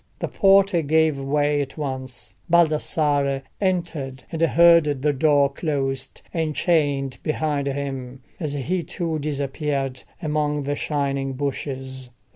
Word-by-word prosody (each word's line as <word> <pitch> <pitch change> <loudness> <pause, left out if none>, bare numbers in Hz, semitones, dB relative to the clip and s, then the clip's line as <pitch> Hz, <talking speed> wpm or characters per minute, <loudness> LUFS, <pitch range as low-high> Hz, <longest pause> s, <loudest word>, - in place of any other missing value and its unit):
The - - -3
porter 195 -3 +4
gave 155 -1 +2
way 145 +1 +1
at 135 +1 -6
once, 130 -3 -6 0.2
Baldassarre 150 -4 +2 0.2
entered, 170 -9 -2
and 165 -1 -4
heard 170 0 +6 0.2
the 150 -1 +3
door 145 0 +4
closed 135 -4 -3
and 160 -3 -1
chained 145 -6 +1
behind 150 -2 -1
him, 135 -2 -4 0.2
as 155 -5 -3
he 165 +6 -1
too 165 -2 -3
disappeared 140 -2 -2 0.2
among 150 -3 -1
the 145 +1 -1
shining 140 -2 -1
bushes. 130 -1 -4
145 Hz, 120 wpm, -23 LUFS, 135-160 Hz, 0.2 s, heard